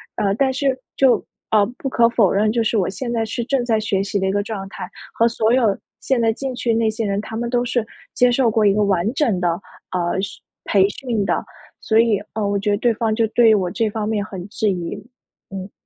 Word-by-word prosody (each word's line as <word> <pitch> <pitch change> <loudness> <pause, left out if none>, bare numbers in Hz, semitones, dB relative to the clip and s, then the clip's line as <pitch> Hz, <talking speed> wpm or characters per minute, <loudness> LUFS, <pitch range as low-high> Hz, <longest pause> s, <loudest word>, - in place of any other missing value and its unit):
呃， 200 -1 +1
但 265 +3 +2
是， 265 0 0 0.2
就 265 -2 +4 0.3
呃， 215 -2 +5
不 270 - -4
可 235 -2 +4
否 220 -6 +3
认， 210 +2 +2
就 230 0 +1
是 225 - 0
我 190 - +1
现 235 +5 -4
在 230 -1 0
是 235 +2 -3
正 270 -1 0
在 225 -2 +2
学 205 -3 0
习 200 0 -2
的 190 - 0
一 - - +1
个 205 - +1
状 200 -3 -5
态， 180 - -7 0.3
和 230 - +3
所 225 -1 +1
有 230 -6 +3 0.3
现 250 -1 +1
在 225 -1 +3
进 265 +1 -4
去 240 -2 0
那 225 -1 +2
些 220 +1 -3
人， 200 0 -1
他 220 - -8
们 235 0 -2
都 245 -1 +1
是 240 -2 0 0.3
接 250 0 +4
受 240 -2 +2
过 220 0 +2
一 200 - +6
个 210 +1 +2
完 195 +1 +1
整 230 -12 +1
的， 175 0 0 0.3
呃， 180 +1 -1
训 195 - -6 0.3
培 195 -1 +4
训 230 -3 -2
的。 - - 0 0.4
所 220 0 +3
以， 230 -3 +3
呃， 215 -2 -1
我 200 0 0
觉 210 - -1
得 205 - +2
对 235 +1 +2
方 220 0 0
就 230 - +2
对 230 +1 +4
于 215 - +6
我 180 -3 -1
这 225 -2 0
方 210 0 -3
面 215 -2 0
很 190 -3 -7
质 215 0 0
疑， 175 -2 -3 0.5
嗯。 195 0 -7
220 Hz, 265 characters per minute, -20 LUFS, 200-235 Hz, 0.5 s, 一